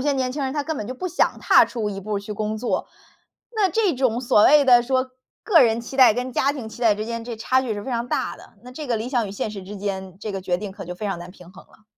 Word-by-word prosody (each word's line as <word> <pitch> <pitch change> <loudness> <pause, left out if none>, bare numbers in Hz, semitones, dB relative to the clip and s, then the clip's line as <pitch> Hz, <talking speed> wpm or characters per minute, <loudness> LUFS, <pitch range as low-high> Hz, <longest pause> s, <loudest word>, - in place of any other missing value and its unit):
些 285 +2 +1
年 260 -1 -1
轻 285 +1 -3
人 265 0 -2
他 290 - 0
根 315 +2 -3
本 210 - -4
就 255 - -5
不 365 - -5
想 365 0 0
踏 - - +5
出 220 -4 -3
一 195 -1 -6
步 205 +1 -3
去 200 +1 -7
工 215 +1 -3
作。 235 +3 -2 0.7
那 420 -3 +3
这 405 -2 +1
种 250 -2 0
所 210 -3 +4
谓 295 -1 +6
的 245 -2 +6
说 255 +1 0 0.3
个 350 -8 +5
人 230 -1 +3
期 265 +3 -8
待， 245 -5 +7
跟 250 +2 -3
家 275 - +2
庭 275 -6 -6
期 220 - -11
待 225 -4 +4
之 210 +1 -4
间， 230 0 -4
这 235 -2 -6
差 255 +4 +1
距 235 -5 -3
是 205 - -6
非 - - -5
常 235 0 -2
大 - - -1
的， - - -16
那 250 - -11
这 300 +2 -7
个 235 -2 0
理 230 +4 -4
想 235 -6 0
与 - - -7
现 205 - -3
实 200 -2 -8
之 205 +3 -8
间， 190 -2 -5
这 210 0 -5
个 195 - -4
决 180 -1 -1
定 195 +1 -6
可 195 -3 -9
就 180 - -5
非 195 - -7
常 195 -4 -2
难 175 +1 -9
平 180 -1 -16
衡 190 - -14
了。 215 - -24
230 Hz, 325 characters per minute, -23 LUFS, 205-260 Hz, 0.7 s, 待